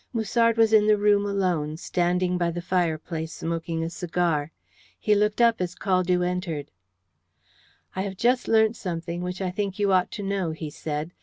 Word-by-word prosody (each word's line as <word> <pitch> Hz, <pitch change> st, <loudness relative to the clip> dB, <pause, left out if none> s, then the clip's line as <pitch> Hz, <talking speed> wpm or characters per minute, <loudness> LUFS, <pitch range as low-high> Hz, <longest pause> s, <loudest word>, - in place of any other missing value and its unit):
Musard 230 Hz, 0 st, +2 dB
was 225 Hz, -1 st, +4 dB
in 210 Hz, -1 st, +6 dB
the 215 Hz, -1 st, +5 dB
room 205 Hz, 0 st, +3 dB
alone, 175 Hz, -6 st, -1 dB
standing 180 Hz, +1 st, 0 dB
by 175 Hz, -1 st, +1 dB
the 170 Hz, +1 st, -4 dB
fireplace, 165 Hz, -2 st, -2 dB
smoking 165 Hz, 0 st, -3 dB
a 165 Hz, -, -2 dB
cigar. 165 Hz, -4 st, -1 dB, 0.5 s
He 210 Hz, -, +2 dB
looked 210 Hz, +1 st, +1 dB
up 230 Hz, -3 st, +4 dB
as 180 Hz, -1 st, -3 dB
Caldew 185 Hz, -2 st, +1 dB
entered. 180 Hz, -5 st, -3 dB, 1.2 s
"I 190 Hz, -, -1 dB
have 190 Hz, -1 st, -4 dB
just 245 Hz, +4 st, +2 dB
learnt 220 Hz, 0 st, +4 dB
something 170 Hz, -1 st, -4 dB
which 180 Hz, +2 st, -4 dB
I 185 Hz, -, -1 dB
think 200 Hz, 0 st, -3 dB
you 200 Hz, -2 st, +2 dB
ought 185 Hz, -1 st, +3 dB
to 205 Hz, -, -5 dB
know," 195 Hz, -4 st, -1 dB
he 155 Hz, -1 st, -6 dB
said. 150 Hz, +2 st, -4 dB
180 Hz, 175 wpm, -25 LUFS, 170-205 Hz, 1.2 s, in